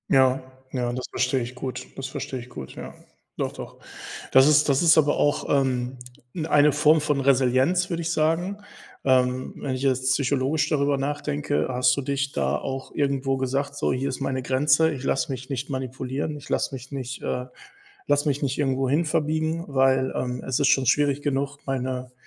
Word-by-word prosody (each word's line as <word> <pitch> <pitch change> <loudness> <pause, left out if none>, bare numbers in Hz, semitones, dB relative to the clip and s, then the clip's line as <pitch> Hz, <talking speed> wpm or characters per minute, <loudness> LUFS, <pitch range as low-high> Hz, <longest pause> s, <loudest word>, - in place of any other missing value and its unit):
Ja, 130 -1 +4 0.3
ja, 125 -2 -1
das 125 0 -4
verstehe 130 0 0
ich 120 +2 -6
gut, 125 -1 -5
das 135 - -5
verstehe 130 0 -5
ich 120 +1 -11
gut, 70 - -9
ja. - - -8 0.4
Doch, - - -2
doch. - - -9 0.6
Das 130 +1 +7
ist 150 0 +5
das 140 +1 +3
ist 165 -1 +6
aber 145 -1 +3
auch, 145 - +1
ähm, 130 -2 0 0.4
n 160 -3 -3
eine 150 -1 +5
Form 150 +2 +4
von 150 -2 0
Resilienz, 135 +6 +2
würde 170 -1 -2
ich 170 +1 -1
sagen. 165 +6 0 0.5
Ähm, 130 -1 +2
wenn 135 - -3
ich 130 - -4
jetzt 130 -1 +2
psychologisch 140 +2 +1
darüber 140 -2 +1
nachdenke, 145 +1 -1
hast 125 0 +2
du 140 - -2
dich 140 +1 -1
da - - 0
auch 135 0 -5
irgendwo 140 -2 0
gesagt: 135 +2 -2
„So, - - 0
hier 130 +2 -1
ist 130 - -5
meine 130 -1 -2
Grenze, 145 +5 +3
ich 135 -3 -6
lasse 135 -1 0
mich 130 +1 -6
nicht 135 0 -3
manipulieren, 130 +3 -3
ich 145 +1 -11
lasse - - 0
mich 135 +2 -9
nicht 130 -2 -5
äh, 125 0 -2 0.6
lasse 145 +1 +2
mich 145 0 -1
nicht 135 -1 -1
irgendwo 135 -2 0
hin 150 +6 +2
verbiegen, 160 +1 -1
weil, 135 -1 +2
ähm, 125 0 -3
es 130 - 0
ist 140 - +4
schon 135 -2 +3
schwierig 145 +2 +2
genug, 140 0 -1
meine 130 -1 -3
135 Hz, 190 wpm, -25 LUFS, 130-145 Hz, 0.6 s, Das